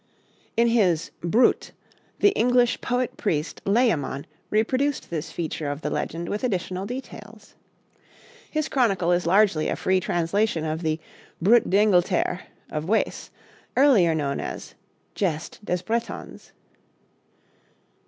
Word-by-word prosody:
In 235 0 +4
his 185 -8 +2
'Brut,' 215 +9 +2 0.5
the 410 - +7
English 245 - +2
poet 245 0 -1
priest 155 -6 -2
Layamon 195 - +1 0.2
reproduced 255 +6 0
this 160 -3 -4
feature 160 -3 -3
of 145 +1 -4
the - - -3
legend 170 +1 -3
with 210 +6 -3
additional 190 -4 -2
details. 225 -4 -9 1.0
His 310 -1 -1
chronicle 195 -10 +1
is 175 -1 +1
largely 190 -4 +3
a - - 0
free 185 0 +1
translation 175 0 0
of 155 +1 -2
the 155 -1 -1 0.4
'Brut 225 +7 +4
d'Engleterre' 185 -2 +2 0.2
of 150 0 -3
Wace, 220 - 0 0.5
earlier 220 - +5
known 140 -3 -1
as - - -6 0.4
'Geste 170 0 -3
des 180 -2 -1
Bretons.' 230 +3 -4
190 Hz, 120 wpm, -24 LUFS, 165-230 Hz, 1.0 s, the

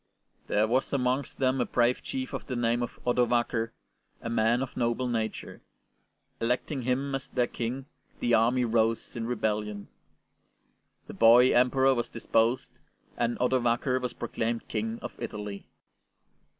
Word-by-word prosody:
There 105 +1 +2
was 130 +4 +1
amongst 130 0 0
them 130 -1 +1
a - - +1
brave 120 +1 +2
chief 265 -1 -5
of - - -5
the 130 - -3
name 120 0 +1
of 120 - -5
Odovaker, 120 -1 +1 0.5
a 115 - -5
man 115 +3 +2
of 135 - -8
noble 120 +1 0
nature. 115 -2 -3 0.8
Electing 125 +4 -1
him 130 +3 -1
as 135 0 -4
their 125 -1 +1
King, 125 +3 -4 0.3
the 120 - +1
army 120 +3 +3
rose 115 0 0
in 115 -1 -3
rebellion. 105 -3 -2 1.2
The - - -9
boy 120 +3 +6
Emperor 130 +2 +4
was 120 -2 -2
deposed, 115 +1 0 0.4
and 120 0 0
Odovaker 125 0 +1
was 125 -1 -3
proclaimed 115 0 -3
King 225 +1 -2
of - - -5
Italy. 105 -2 -6
120 Hz, 140 wpm, -28 LUFS, 115-130 Hz, 1.2 s, boy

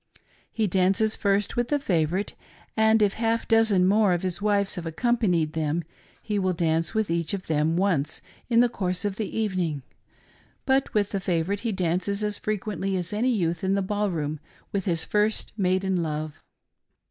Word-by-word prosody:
He 220 - 0
dances 195 +3 +2
first 200 0 0
with 240 0 0
the 295 - +1
favorite, 180 - 0 0.4
and, 220 0 +4
if 200 -1 +2
half 230 0 0
a - - -14
dozen 220 -5 +4
more 205 -1 +4
of 175 - -2
his 185 0 -2
wives 200 -1 +2
have 170 -2 -4
accompanied 175 -4 +1
them, 160 +1 -1 0.4
he 210 -2 -1
will 185 -1 +1
dance 165 +3 0
with 220 -5 0
each 170 +2 -1
of 185 - -7
them 155 +1 +1
once 170 -6 0 0.3
in 235 -1 +5
the 245 - +5
course 185 -4 -2
of 200 -1 -2
the 220 - -3
evening; 180 -10 -1 0.8
but 265 0 +2
with 205 -1 +1
the 195 - -1
favorite 185 +1 -1
he 230 +1 -2
dances 190 +2 -1
as 210 -1 -1
frequently 205 -2 -2
as 180 +2 -4
any 230 +5 +1
youth 170 -8 0
in 190 +1 +2
the 200 - 0
ball 205 +1 -1
room 155 -3 -3 0.3
with 195 -2 -2
his 165 -3 +1
first 210 +1 0
maiden 190 -2 +1
love. 155 -1 -3
195 Hz, 180 wpm, -25 LUFS, 170-215 Hz, 0.8 s, in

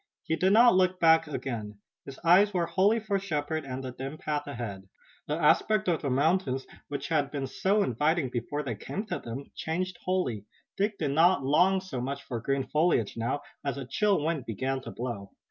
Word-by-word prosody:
He 160 - 0
did 185 +3 +2
not 235 +2 +7
look 185 0 +2
back 160 -1 +5
again. 115 -8 -5 0.3
His 135 - -9
eyes 190 +4 +5
were 175 -2 +2
wholly 195 +6 +3
for 205 -2 -1
Shepard 155 -5 -2
and 130 0 -5
the 130 - -5
dim 135 +4 -6
path 150 -2 -3
ahead. 105 -8 -6 0.4
The 150 - 0
aspect 210 +7 +3
of 170 -3 +1
the 140 - -1
mountains, 135 0 +1 0.2
which 145 0 -5
had 150 -4 +1
been 140 -2 -3
so 200 +9 +1
inviting 150 - +1
before 130 +5 -3
they 130 -5 -3
came 200 - -5
to - - -3
them, 120 +4 -7
changed 180 +3 -3
wholly. 155 - -1 0.3
Dick 205 +1 0
did 150 -3 -1
not 165 +1 +4
long 180 +7 +4
so 185 -10 -5
much 140 +2 -4
for 120 -3 -4
green 135 +2 0
foliage 150 - +1
now, 120 +5 -2 0.2
as 140 -1 -2
a 135 - -5
chill 200 - +2
wind 160 -5 -2
began 130 +4 -2
to - - -8
blow. 115 -5 -5
150 Hz, 195 wpm, -28 LUFS, 130-185 Hz, 0.4 s, not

